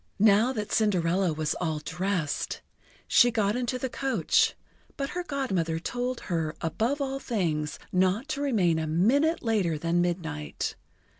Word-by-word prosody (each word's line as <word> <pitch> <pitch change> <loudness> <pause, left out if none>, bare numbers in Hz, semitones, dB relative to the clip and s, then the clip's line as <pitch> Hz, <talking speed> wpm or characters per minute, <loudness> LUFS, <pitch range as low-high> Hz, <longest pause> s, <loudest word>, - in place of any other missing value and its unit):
Now 215 +4 +5
that 210 -4 -4
Cinderella 185 -3 +2
was 155 0 -1
all 160 -3 0
dressed, 175 0 -2 0.5
she 245 - +6
got 215 -2 +1
into 250 0 -1
the 260 - -2
coach; 250 - +1 0.4
but 275 0 -3
her 355 - -2
Godmother 195 - -1
told 245 +8 -3
her 165 -3 -2
above 225 - -1
all 270 0 -2
things 165 - -1
not 190 +8 +2
to 290 -2 -2
remain 190 - +2
a 160 - -2
minute 255 - +2
later 200 -9 +1
than 170 +3 +1
midnight. 165 - -3
200 Hz, 145 wpm, -27 LUFS, 165-245 Hz, 0.5 s, she